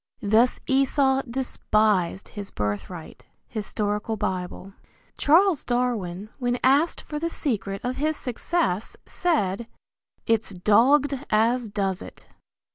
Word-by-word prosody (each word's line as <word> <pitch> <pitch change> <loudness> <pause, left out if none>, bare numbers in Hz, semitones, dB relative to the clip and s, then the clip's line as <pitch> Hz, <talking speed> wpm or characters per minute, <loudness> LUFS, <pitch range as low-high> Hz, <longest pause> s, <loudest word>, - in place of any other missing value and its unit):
Thus 220 +4 +3
Esau 270 0 +2
despised 215 -7 0
his 205 -2 -7
birthright. 105 - -5 0.2
Hist. 215 -3 -7 0.4
Bible. 190 -1 -4 0.5
Charles 335 +2 +4
Darwin 215 -6 -2
when 245 -1 0
asked 285 +6 +3
for 300 - -5
the 335 +2 -1
secret 200 -11 -2
of 250 +1 -2
his 305 +2 0
success 245 - -2
said, 235 - 0 0.6
"It's 225 -3 0
dogged 265 +9 +3
as 230 +2 +2
does 195 -2 -1
it." - - -11
230 Hz, 110 wpm, -25 LUFS, 200-270 Hz, 0.6 s, Charles